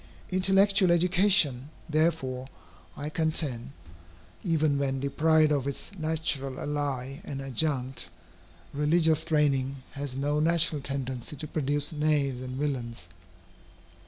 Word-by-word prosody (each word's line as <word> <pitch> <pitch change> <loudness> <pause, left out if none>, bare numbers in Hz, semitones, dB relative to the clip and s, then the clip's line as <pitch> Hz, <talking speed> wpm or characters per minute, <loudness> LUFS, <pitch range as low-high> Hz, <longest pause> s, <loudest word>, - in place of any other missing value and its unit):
Intellectual 195 +1 +4
education, 175 -6 +3 0.2
therefore, 155 -5 0 0.5
I 145 +1 -4
contend, 155 -6 -1 0.7
even 155 -5 +1
when 135 -1 -1
deprived 155 +3 +3
of 140 -2 0
its 140 - -4
natural 155 -5 -2
ally 140 -2 -3
and 135 - -6
adjunct, 135 -1 -2 0.6
religious 155 +2 +2
training, 140 -3 +1
has 140 -2 -5
no 145 +2 0
natural 160 -2 +2
tendency 130 0 -4
to 155 +2 -6
produce 145 0 -1
knaves 150 -4 0
and 130 0 -6
villains. 120 -10 -3
145 Hz, 105 wpm, -28 LUFS, 135-160 Hz, 0.7 s, Intellectual